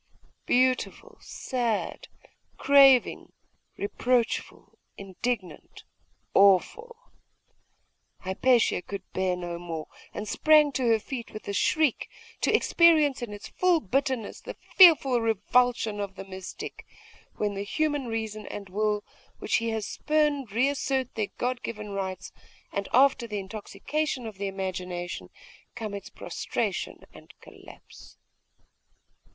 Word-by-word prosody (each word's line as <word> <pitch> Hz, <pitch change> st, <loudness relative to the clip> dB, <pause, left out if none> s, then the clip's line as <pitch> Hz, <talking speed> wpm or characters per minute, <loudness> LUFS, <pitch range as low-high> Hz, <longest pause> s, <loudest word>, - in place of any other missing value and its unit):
Beautiful, 255 Hz, +1 st, 0 dB
sad, 240 Hz, -4 st, -3 dB, 0.5 s
craving, 275 Hz, -2 st, +5 dB, 0.4 s
reproachful, 235 Hz, +3 st, -1 dB, 0.2 s
indignant, 195 Hz, -2 st, -5 dB, 0.5 s
awful.... 200 Hz, -, +3 dB, 1.3 s
Hypatia 225 Hz, +2 st, +2 dB
could 200 Hz, 0 st, -7 dB
bear 185 Hz, -1 st, 0 dB
no 175 Hz, -1 st, -5 dB
more: 165 Hz, -3 st, -5 dB, 0.3 s
and 210 Hz, -, -6 dB
sprang 305 Hz, +4 st, +4 dB
to 260 Hz, -2 st, -1 dB
her 225 Hz, -1 st, +5 dB
feet 235 Hz, +2 st, -7 dB
with 215 Hz, -, -9 dB
a 200 Hz, -, -3 dB
shriek, 300 Hz, +6 st, +1 dB, 0.3 s
to -, -, +2 dB
experience 310 Hz, -6 st, +4 dB
in 240 Hz, -3 st, -5 dB
its 205 Hz, 0 st, -9 dB
full 360 Hz, -2 st, +2 dB
bitterness 260 Hz, -1 st, -2 dB
the -, -, -8 dB, 0.2 s
fearful 290 Hz, -9 st, +7 dB
revulsion 225 Hz, 0 st, +1 dB
of 200 Hz, -1 st, -4 dB
the 195 Hz, +1 st, -8 dB
mystic, 190 Hz, -1 st, -8 dB, 0.5 s
when 205 Hz, -1 st, -1 dB
the 200 Hz, -, -4 dB
human 290 Hz, +5 st, -1 dB
reason 220 Hz, -2 st, -4 dB
and 200 Hz, -2 st, -7 dB
will 210 Hz, +2 st, 0 dB, 0.3 s
which -, -, 0 dB
he 230 Hz, 0 st, -2 dB
has 220 Hz, -2 st, -2 dB
spurned 295 Hz, -5 st, 0 dB
reassert 265 Hz, +2 st, 0 dB
their 215 Hz, -2 st, -2 dB
God 250 Hz, 0 st, -2 dB
given 210 Hz, -2 st, -6 dB
rights; 190 Hz, -2 st, -4 dB, 0.4 s
and 200 Hz, -1 st, -3 dB
after 260 Hz, -2 st, +4 dB
the 210 Hz, -2 st, -4 dB
intoxication 225 Hz, +8 st, -4 dB
of 215 Hz, -3 st, -8 dB
the 200 Hz, -, -2 dB
imagination, 185 Hz, -2 st, -5 dB, 0.5 s
come 220 Hz, -4 st, -5 dB
its 200 Hz, -1 st, -7 dB
prostration -, -, -4 dB
and -, -, -16 dB
collapse. -, -, -15 dB
225 Hz, 120 wpm, -27 LUFS, 200-265 Hz, 1.3 s, fearful